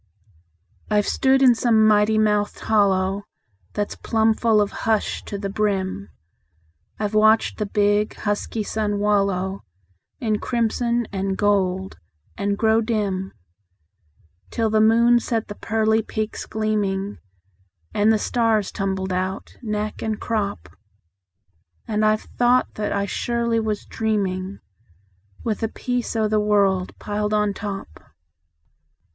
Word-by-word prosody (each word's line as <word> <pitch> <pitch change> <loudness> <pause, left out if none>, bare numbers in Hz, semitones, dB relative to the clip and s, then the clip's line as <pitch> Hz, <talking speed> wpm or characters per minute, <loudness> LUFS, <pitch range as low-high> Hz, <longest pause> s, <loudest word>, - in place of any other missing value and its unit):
I've 210 -1 +2
stood 265 0 +3
in 250 -2 +7
some 225 -2 +3
mighty 215 0 +4
mouthed 210 -1 +1
hollow 195 -2 +2 0.5
That's 205 -1 -2
plumb 220 -1 +2
full 220 -1 +2
of 205 -1 +1
hush 220 -2 -1
to 200 - -5
the 200 0 -3
brim; 195 - -1 0.9
I've 210 0 -2
watched 215 +2 +3
the 210 - -1
big, 205 +1 +1
husky 210 +1 -2
sun 210 -1 -1
wallow 195 -2 0 0.6
In 215 -3 0
crimson 235 0 0
and 195 -1 -2
gold, 190 - 0 0.4
and 200 0 -1
grow 220 +1 +3
dim, 200 -4 -1 1.2
Till 225 -2 0
the 215 0 +3
moon 235 +2 +5
set 230 -2 -2
the - - -4
pearly 220 +1 +1
peaks 215 0 -4
gleaming, 205 -2 -1 0.7
And 210 +1 +3
the 220 - +3
stars 220 -2 +1
tumbled 190 -1 -2
out, 185 +1 -3
neck 215 -2 -3
and 220 -1 -2
crop; 200 - -2 1.2
And 215 0 0
I've 215 0 +2 0.2
thought 245 +1 +3
that 210 -1 -3
I 200 0 0
surely 235 +2 -1
was 215 -2 -2
dreaming, 200 -3 -2 0.8
With 220 -3 -1
the 225 - -1
peace 245 0 -3
o' 220 -1 +2
the 215 0 +2
world 200 -3 +1
piled 210 0 -2
on 210 -1 +1
top. 195 - -6
210 Hz, 130 wpm, -22 LUFS, 200-220 Hz, 1.2 s, in